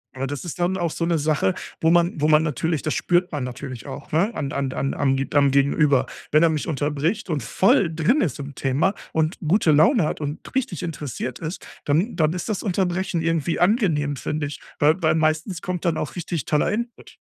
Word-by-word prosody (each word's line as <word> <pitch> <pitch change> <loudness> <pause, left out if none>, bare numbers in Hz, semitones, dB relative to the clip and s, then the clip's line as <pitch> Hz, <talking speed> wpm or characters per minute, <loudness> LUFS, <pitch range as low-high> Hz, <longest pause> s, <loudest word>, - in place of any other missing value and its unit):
Aber 135 +1 -3
das 145 +5 -5
ist 175 +1 -6
dann 180 +2 +1
auch 170 -3 -1
so 165 - -2
'ne 170 -1 +1
Sache, 145 -11 +1 0.3
wo 160 - +4
man 170 -1 +3
wo 150 - +3
man 155 0 +5
natürlich 160 +1 -1
das 155 - -1
spürt 175 0 +1
man 145 -4 -3
natürlich 125 -2 -7
auch, - - -8
ne, 185 +9 +2
an 140 -2 -3
an 140 -2 -2
an 135 - -2
am 135 -1 +1
Ge 135 0 -2
am 140 -1 +5
Gegenüber. 140 -1 +3 0.3
Wenn 155 +2 +5
er 165 - +5
mich 155 -2 -2
unterbricht 155 - -1
und 150 - -1
voll 170 - +3
drin 190 - +2
ist 150 -10 -1
im 140 0 -6
Thema 140 +9 +1 0.2
und 160 +2 0
gute 175 -1 +4
Laune 210 - +5
hat 155 - -3
und 145 +1 -3 0.2
richtig 185 - -1
interessiert 140 -6 -5
ist, 165 +3 -6 0.2
dann 165 +11 +1
dann 155 0 +2
ist 180 - -4
das 215 -4 -2
Unterbrechen 185 -2 0
irgendwie 165 -1 0
angenehm, 175 - +2
finde 150 +3 -3
ich, 145 - -8 0.2
weil 155 +5 +3
weil 160 0 +3
meistens 160 +3 0
kommt 180 -1 -3
dann 165 -2 +1
auch 155 - -4
richtig 170 -2 -3
toller 150 +4 +1
Input. 235 +2 -5
155 Hz, 215 wpm, -23 LUFS, 145-175 Hz, 0.3 s, man